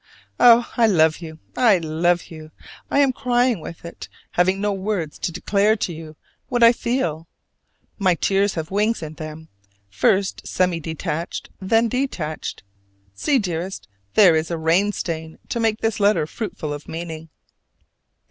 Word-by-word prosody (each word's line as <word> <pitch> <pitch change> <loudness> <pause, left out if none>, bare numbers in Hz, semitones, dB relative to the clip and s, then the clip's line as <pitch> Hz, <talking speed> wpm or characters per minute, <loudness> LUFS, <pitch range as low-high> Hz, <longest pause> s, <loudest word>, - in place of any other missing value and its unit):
Oh, 240 -1 +7
I 230 -2 +5
love 160 -6 +3
you, 160 -2 -9 0.2
I 225 -6 +5
love 170 +2 0
you! 155 -1 -10 0.4
I - - 0
am 270 -2 +3
crying 245 -3 +1
with 165 +2 -9
it, 170 - -9 0.2
having 185 +2 +2
no 205 0 0
words 190 -5 -3
to - - -2
declare 200 +4 +2
to 190 -5 -3
you 155 -1 -10 0.3
what 245 -1 +2
I 230 - +9
feel. 170 - -2 0.7
My 185 -3 +3
tears 195 +3 +1
have 160 0 -4
wings 210 0 +1
in 155 0 -6
them: 155 +1 -9 0.4
first 190 - +1
semi 180 -2 +1
detached, 160 +1 -4
then 225 +4 +2
detached. 215 - -3 0.5
See, 270 - +1
dearest, 185 -3 -3 0.3
there 185 -6 +7
is 160 +1 0
a 170 - -2
rain 170 +6 +2
stain 160 -4 -5
to 235 - -2
make 225 -1 0
this 225 -1 0
letter 205 -5 +3
fruitful 160 -4 -5
of 145 0 -8
meaning! 165 -1 -6
180 Hz, 155 wpm, -22 LUFS, 160-215 Hz, 0.7 s, I